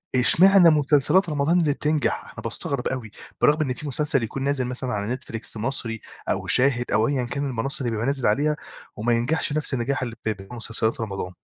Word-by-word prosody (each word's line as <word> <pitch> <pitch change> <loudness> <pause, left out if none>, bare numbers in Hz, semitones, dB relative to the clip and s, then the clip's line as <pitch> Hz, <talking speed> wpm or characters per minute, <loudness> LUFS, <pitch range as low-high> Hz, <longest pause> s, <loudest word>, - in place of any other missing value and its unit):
إشمعنى 180 +7 +6
مسلسلات 150 +4 +3
رمضان 150 +4 +2
اللي 150 -4 +2
بتنجح؟ 150 0 0
أنا - - -10
باستغرب 140 -3 -3
أوي، 120 -5 -4 0.3
برغم 150 +2 +4
إن 130 -4 0
في 145 +4 -7
مسلسل 140 -2 0
يكون 135 +4 -4
نازل 140 -2 0
مثلًا 125 0 -4
على 100 0 -2
نتفليكس 115 -4 -4
مصري 115 -1 -3 0.3
أو - - -1
شاهد 125 -2 +3
أو 110 +1 +3
أيًا 135 -3 0
كان 140 +4 -3
المنّصة 135 +3 -3
اللي 120 - -1
بيبقى 115 +1 -2
نازل 135 -3 0
عليها 150 +8 +2 0.4
وما 120 +3 0
ينجحش 145 +6 +1
نفس 150 -2 -2
النجاح 130 +3 -1
اللي 120 -2 -5
بب 100 -3 -3
مسلسلات 115 0 -2
رمضان. 95 -4 -4
130 Hz, 190 wpm, -24 LUFS, 115-145 Hz, 0.4 s, إشمعنى